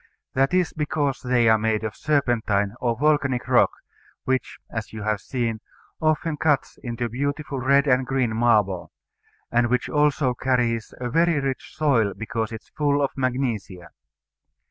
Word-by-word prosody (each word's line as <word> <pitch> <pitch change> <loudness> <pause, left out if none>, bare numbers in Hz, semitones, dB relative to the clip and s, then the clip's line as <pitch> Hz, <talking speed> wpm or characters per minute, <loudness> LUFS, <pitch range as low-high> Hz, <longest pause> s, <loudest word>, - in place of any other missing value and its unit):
That 135 +1 +2
is 180 -1 +1
because 145 -3 -1
they 125 -2 +2
are 110 0 +5
made 110 0 0
of 110 - -4
serpentine 115 -9 +1
or 120 -2 0
volcanic 140 -3 +1
rock, - - +5 0.5
which 130 0 -1
(as 110 -1 -5
you 110 -1 -7
have 105 -2 -1
seen) 115 -4 -2 0.4
often 155 0 +1
cuts 150 -2 0
into 120 0 -3
beautiful 140 +3 -3
red 140 +2 +3
and 130 -2 +3
green 125 -3 0
marble; 105 -6 +2 0.6
and 120 0 +3
which 125 0 0
also 145 -3 +2
carries 120 -3 0
a 125 -1 -3
very 165 0 +3
rich 135 -2 -4
soil 130 -10 +2
because 110 0 -3
it 110 -1 -7
is - - -29
full 145 -1 +2
of 140 -1 +1
magnesia. 120 -9 -2
125 Hz, 155 wpm, -24 LUFS, 110-140 Hz, 0.6 s, are